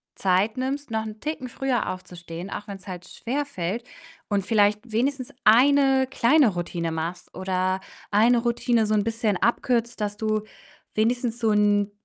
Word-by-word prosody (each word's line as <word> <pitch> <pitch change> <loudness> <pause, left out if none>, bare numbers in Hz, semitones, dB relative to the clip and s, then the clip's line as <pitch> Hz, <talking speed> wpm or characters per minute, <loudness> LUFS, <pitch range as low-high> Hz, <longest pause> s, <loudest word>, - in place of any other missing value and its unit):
Zeit 195 +3 +2
nimmst, 265 +1 -3
noch 220 -1 0
'n 215 0 -8
Ticken 300 -3 -4
früher 255 -1 -1
aufzustehen, 175 -1 -8
auch 205 +1 -6
wenn's 195 -1 -9
halt 180 -2 -7
schwerfällt, 235 -6 -3 0.5
und 200 -2 0
vielleicht 210 +1 +2
wenigstens 255 +3 -1
eine 265 +2 +5
kleine 265 +1 +4
Routine 170 -1 -3
machst 165 +2 -5
oder 185 0 -1 0.3
eine 225 +4 +5
Routine 235 -1 +1
so 215 - 0
'n 210 -1 +3
bisschen 225 -2 0
abkürzt, 235 +4 0
dass 205 -1 -2
du 215 0 -1 0.5
wenigstens 235 +1 +1
so 225 -2 +2
'n 205 -1 +3
215 Hz, 150 wpm, -25 LUFS, 195-245 Hz, 0.5 s, eine